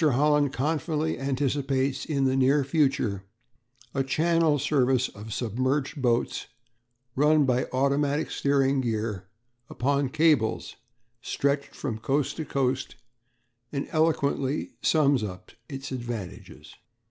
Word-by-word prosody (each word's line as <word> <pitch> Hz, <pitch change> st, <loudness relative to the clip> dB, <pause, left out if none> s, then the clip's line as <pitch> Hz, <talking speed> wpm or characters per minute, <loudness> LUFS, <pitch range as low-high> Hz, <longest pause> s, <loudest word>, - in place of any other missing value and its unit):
Holland 150 Hz, 0 st, +3 dB
confidently 155 Hz, +3 st, -1 dB
anticipates 135 Hz, 0 st, -1 dB
in 140 Hz, -4 st, 0 dB
the 130 Hz, 0 st, +2 dB
near 135 Hz, +2 st, +3 dB
future 135 Hz, -, 0 dB, 0.7 s
a 135 Hz, -, +1 dB
Channel 160 Hz, +2 st, +2 dB
service 130 Hz, -3 st, +2 dB
of 105 Hz, +2 st, -10 dB
submerged 130 Hz, +6 st, -1 dB
boats 120 Hz, -1 st, 0 dB, 0.7 s
run 150 Hz, +1 st, +4 dB
by 125 Hz, -1 st, +1 dB
automatic 140 Hz, +3 st, +1 dB
steering 140 Hz, -1 st, +2 dB
gear 110 Hz, -5 st, -3 dB, 0.4 s
upon 140 Hz, +1 st, 0 dB
cables 150 Hz, -6 st, +1 dB, 0.5 s
stretched 140 Hz, +1 st, -1 dB
from 115 Hz, -6 st, -4 dB
coast 135 Hz, +5 st, 0 dB
to 160 Hz, -, -3 dB
coast, 130 Hz, -2 st, -1 dB, 0.8 s
and 140 Hz, -1 st, -3 dB
eloquently 150 Hz, -3 st, 0 dB
sums 140 Hz, -6 st, +3 dB
up 90 Hz, -3 st, -7 dB, 0.2 s
its 135 Hz, -1 st, -6 dB
advantages. 120 Hz, -7 st, -7 dB
135 Hz, 110 wpm, -26 LUFS, 125-145 Hz, 0.8 s, run